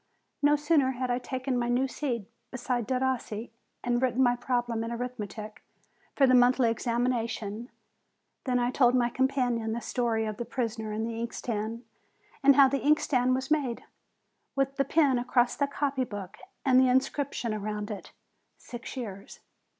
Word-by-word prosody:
No 290 0 +5
sooner 295 -3 +2
had 250 0 -2
I 245 - +1
taken 260 0 -3
my 240 0 -1
new 250 +2 +2
seat, 245 -7 -3 0.2
beside 245 -2 -2
Derossi, 255 -4 -2 0.3
and 240 0 +1
written 260 0 +2
my 245 -1 +4
problem 240 -2 -1
in 230 - -4
arithmetic 220 -3 -6 0.5
for 275 - +5
the 255 - +4
monthly 245 -1 +5
examination, 230 -1 -2 0.8
than 250 -2 +1
I 245 0 +1
told 250 -1 +4
my 240 -1 +2
companion 245 -4 0
the 235 - -2
story 230 -2 -1
of 215 -1 -4
the 240 - -3
prisoner 225 -4 -3
and 220 +1 -2
the 230 0 -4
inkstand, 230 0 -4 0.6
and 280 -1 +6
how 275 -1 +8
the 275 +1 -1
inkstand 255 -4 +3
was 265 +2 -4
made, 275 -6 0 0.7
with 275 0 0
the 275 - +2
pen 280 -6 +3
across 245 0 +2
the 280 - +1
copy 280 -2 -1
book, 205 -3 -7 0.3
and 255 -1 +6
the 260 -1 +5
inscription 260 -2 0
around 210 0 -4
it, 205 - -7 0.5
"Six 240 +2 -9
years!" 200 -6 -7
245 Hz, 160 wpm, -28 LUFS, 230-260 Hz, 0.8 s, how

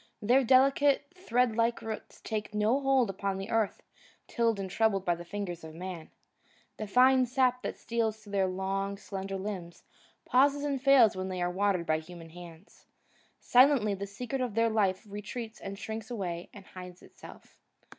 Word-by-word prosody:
Their 250 +6 +3
delicate, 275 +4 +3
thread 250 - 0
like 230 +1 +1
roots 220 -1 -7
take 215 -1 -4
no 215 +6 +2
hold 270 -6 +2
upon 195 0 -3
the 195 +2 -6
earth 225 -3 0 0.4
tilled 230 -3 0
and 195 - -3
troubled 195 0 +1
by 175 - +3
the 170 0 -7
fingers 175 -2 -5
of 160 0 -10
man. 175 -2 -7 0.7
The 215 - -5
fine 255 +3 +5
sap 250 0 +1
that - - -5
steals 225 -2 -1
through 215 -2 -15
their 195 -2 +2
long, 195 +1 -2
slender 195 -1 -5
limbs 190 -4 -6 0.4
pauses 280 +3 +3
and 280 -3 -1
fails 270 -7 +6
when 185 0 -4
they 185 -1 -4
are 175 0 0
watered 190 -2 0
by 155 -1 +1
human 165 0 -12
hands. 175 +2 -14 0.5
Silently 250 -4 +4
the 200 +1 -5
secret 250 +6 -4
of 245 -5 -3
their 230 0 +2
life 200 -1 +1
retreats 215 +3 -7
and 195 0 -6
shrinks 220 +1 -6
away 180 -7 -4
and 200 -3 -13
hides 180 -1 -11
itself. - - -15
210 Hz, 175 wpm, -30 LUFS, 190-245 Hz, 0.7 s, fails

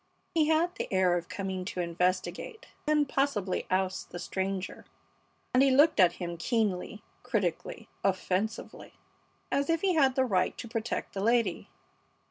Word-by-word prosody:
He 315 -2 +3
had 325 +3 +2
the - - -5
air 185 -2 +3
of 170 0 -3
coming 190 -2 -3
to 185 - -5
investigate 180 - -1 0.2
and 300 -1 +3
possibly 260 -9 0
oust 185 0 -1
the - - -7
stranger, 190 +1 -3 0.7
and 255 - +5
he 275 - +5
looked 285 0 +5
at 180 -2 +6
him 175 -1 -5
keenly, 210 0 -1 0.2
critically, 210 -10 -2 0.2
offensively, 195 +2 -2 0.6
as 280 +2 +1
if 330 -1 +2
he 385 -2 +2
had 270 -5 +3
the 260 - +3
right 185 -6 +1
to 235 - -6
protect 230 0 -3
the 195 - -3
lady. 230 -4 +1
205 Hz, 150 wpm, -29 LUFS, 185-270 Hz, 0.7 s, at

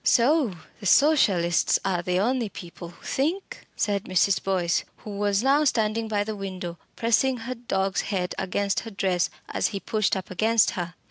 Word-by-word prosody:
"So 255 - +3 0.3
the 205 - -4
Socialists 190 - +4
are 185 -3 0
the 180 +1 -1
only 240 +1 0
people 175 -2 -9
who 170 - -17
think?" 370 - -2
said 200 0 -1
Mrs. 185 0 +2
Boyce, 180 -3 +1 0.2
who 210 - -7
was 205 +1 0
now 280 +3 +4
standing 225 -4 +1
by 205 -2 0
the 215 +1 -4
window, 185 -4 -6 0.2
pressing 240 +3 +2
her 240 +2 -5
dog's 195 -6 -1
head 180 -3 -2
against 195 +1 0
her 225 - -8
dress 190 -3 0 0.2
as - - 0
he 200 - -4
pushed 215 -1 0
up 190 - -7
against 220 +3 +3
her. 175 -1 -5
200 Hz, 175 wpm, -25 LUFS, 185-230 Hz, 0.3 s, Socialists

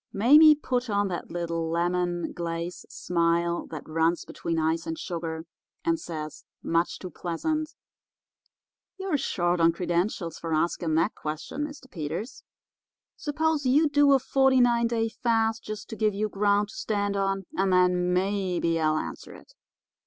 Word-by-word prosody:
Mame 295 +9 +7
put 250 -4 -1
on 205 -1 +1
that 175 - -5
little 170 -1 -2
lemon 175 +1 -1
glacé 170 +1 -4
smile 170 0 0
that 155 -3 -8
runs 165 +2 +1
between 165 -1 -4
ice 160 +1 0
and 160 0 -3
sugar, 165 -2 -5 0.4
and 330 -1 +1
says, 155 - -7 0.2
much 165 +1 0
too 185 - -8
pleasant: 310 - -3 1.2
'You're 380 -6 -1
short 175 -8 0
on 165 0 +6
credentials 175 0 -2
for 165 -1 -2
asking 160 0 0
that 165 +7 +2
question, 155 - -4
Mr. 290 -3 -12
Peters. 170 - -5 0.7
Suppose 305 -1 0
you 295 +5 +4
do 290 -1 +4
a - - +7
forty 265 0 +3
nine 235 -1 +4
day 230 -1 0
fast, 225 -1 0
just 215 -2 -6
to - - -4
give 215 -2 +1
you 215 +1 -1
ground 205 0 +1
to - - -11
stand 205 -2 -1
on, 195 -1 -1
and 195 0 +1
then 180 -1 +3
maybe 180 -3 0
I'll 155 -1 +2
answer - - -6
it. - - -16
185 Hz, 150 wpm, -27 LUFS, 170-235 Hz, 1.2 s, Mame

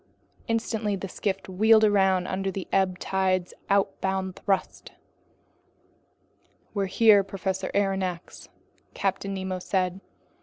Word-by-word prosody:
Instantly 225 -2 -1
the 195 0 -5
skiff 195 +1 -3
wheeled 220 +4 +4
around 190 -3 +3
under 195 +1 -2
the 190 -1 -5
ebb 190 -2 +2
tide's 185 -2 0 0.2
outbound 190 -1 0
thrust. 195 -1 -2 1.8
"Here 200 +3 +2
we - - +12
are, 200 -1 +5
Professor 190 -1 -3
Aronnax," 190 -3 -2 0.5
Captain 195 0 -2
Nemo 190 -1 -3
then - - -9
said. 185 0 -1
195 Hz, 115 wpm, -26 LUFS, 185-200 Hz, 1.8 s, we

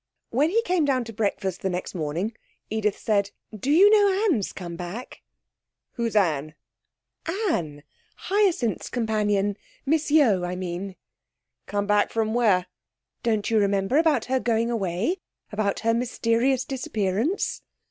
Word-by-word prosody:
When 285 +7 +2
he 455 +5 +2
came 365 -6 +1
down 265 -3 +1
to 225 -1 -9
breakfast 200 -3 -2
the 190 - 0
next 180 0 -4
morning, 170 +6 -2 0.4
Edith 215 -2 0
said 200 -2 +1 0.3
'Do 215 +6 -4
you 350 +7 +7
know 405 -1 +4
Anne's 215 - 0
come 175 -2 -7
back?' 180 +8 -7 0.7
'Who's 230 -2 -3
Anne?' 155 -6 +1 0.7
'Anne. 250 - -2 0.3
Hyacinth's 375 - 0
companion. 210 -3 0 0.3
Miss 310 +2 +1
Yeo, 250 - +4
I 180 +1 -2
mean.' 185 +1 -5 0.7
'Come 205 0 -1
back 205 0 +3
from 220 -1 -1
where?' 210 -7 +3 0.6
'Don't 220 -2 0
you 220 - +4
remember 200 +4 +1
about 310 -8 +2
her 260 +1 +1
going 230 -1 +1
away 205 - -1 0.3
about 205 -1 -1
her 230 0 +2
mysterious 245 +2 +1
disappearance?' 230 - -1
220 Hz, 135 wpm, -25 LUFS, 195-265 Hz, 0.7 s, you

